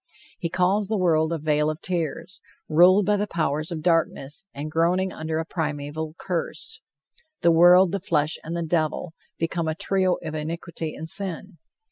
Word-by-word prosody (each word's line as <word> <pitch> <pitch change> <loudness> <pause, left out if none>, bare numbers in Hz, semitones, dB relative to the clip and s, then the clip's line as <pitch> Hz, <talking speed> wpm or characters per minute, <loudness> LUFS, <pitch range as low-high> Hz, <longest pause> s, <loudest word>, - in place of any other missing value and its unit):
He 170 - -2
calls 190 +4 +1
the 215 +1 -1
world 160 -3 +2
a 165 - 0
"vale 150 0 +1
of 155 0 -4
tears," 180 +2 -4 0.3
ruled 180 +5 +5
by 210 0 +2
the 205 +1 -1
powers 155 -2 -1
of 160 -2 -5
darkness, 165 -1 0
and 150 +2 -6
groaning 180 +4 +1
under 160 0 -3
a 160 - -2
primeval 155 -1 -4
curse. 170 -4 -4 0.6
"The 170 - +5
world, 175 +2 +6
the 200 - -1
flesh 155 -4 +1
and 165 +2 -4
the 170 - -2
devil" 160 +1 -1 0.2
become 165 0 -2
a 160 - -1
trio 185 +1 +1
of 155 -1 -5
iniquity 160 +1 -5
and 160 - -7
sin. 190 +2 0
165 Hz, 170 wpm, -24 LUFS, 155-180 Hz, 0.6 s, world